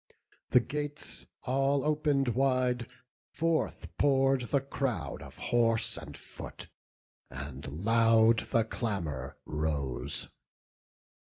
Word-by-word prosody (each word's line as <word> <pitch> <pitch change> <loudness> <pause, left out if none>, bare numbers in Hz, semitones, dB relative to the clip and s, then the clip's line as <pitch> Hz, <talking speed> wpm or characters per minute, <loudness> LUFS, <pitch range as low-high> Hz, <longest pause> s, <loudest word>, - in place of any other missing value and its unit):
The 125 - +7
gates 145 +4 -5 0.2
all 135 +2 +1
open'd 150 -3 +2
wide, 125 -1 +1 0.5
forth 165 +1 0
pour'd 135 -2 +4
the 140 - +3
crowd 125 - -2
Of - - -11
horse 115 -1 +1
and 80 -3 -8
foot; - - -9 0.6
and 70 0 -7 0.2
loud 115 0 +5
the 115 - +3
clamour 85 - -3
rose. 75 -4 -2
120 Hz, 95 wpm, -31 LUFS, 100-135 Hz, 0.6 s, The